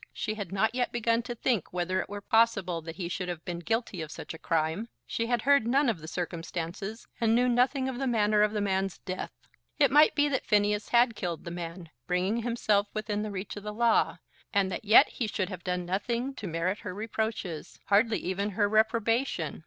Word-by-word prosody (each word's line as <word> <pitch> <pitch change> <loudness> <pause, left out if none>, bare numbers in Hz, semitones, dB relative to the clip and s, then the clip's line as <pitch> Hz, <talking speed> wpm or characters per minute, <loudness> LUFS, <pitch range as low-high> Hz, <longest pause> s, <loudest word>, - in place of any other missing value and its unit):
She 215 - -2
had 205 -5 -6
not 215 +4 +1
yet 250 -1 0
begun 230 0 +1
to 240 0 -6
think 235 - 0
whether 180 +1 0
it - - -8
were 205 0 -6
possible 200 -6 +2
that 165 +1 -8
he 180 -3 -4
should 180 +1 -3
have 170 -2 -5
been 175 -1 -4
guilty 225 -1 -2
of 155 - -5
such - - -7
a 160 - -10
crime. 165 +7 -1 0.2
She 230 - -2
had 240 -2 0
heard 280 -4 +4
none 270 +2 +3
of 210 -7 -1
the 160 - -10
circumstances, 175 +5 -5
and 230 -1 +3
knew 250 +1 +3
nothing 255 +2 +2
of 260 -2 -4
the 270 - -1
manner 210 -3 +3
of 210 0 +4
the 210 -1 -1
man's 195 -1 0
death. 185 -1 -5 0.5
It 280 -5 +4
might 300 +2 +6
be 295 -1 +3
that 265 -2 -2
Phineas 210 -1 +2
had 235 -1 +4
killed 175 -4 -4
the 170 - -6
man, 170 -1 -7 0.2
bringing 185 +5 +1
himself 220 -3 +1
within 210 -1 -2
the 215 - -3
reach 195 0 -5
of 205 - -6
the 210 +1 -6
law, 235 0 +3 0.3
and 195 -2 +2
that 200 - -5
yet 215 +2 +8
he 235 - -3
should 195 -2 -2
have 180 -3 -7
done 180 -1 -2
nothing 235 +8 -2
to 215 -6 -6
merit 170 +4 -1
her 185 -2 -6
reproaches; 215 -6 -4
hardly 215 +2 +3
even 195 +3 -2
her 205 -2 +4
reprobation! 220 - +1
210 Hz, 215 wpm, -29 LUFS, 180-230 Hz, 0.5 s, yet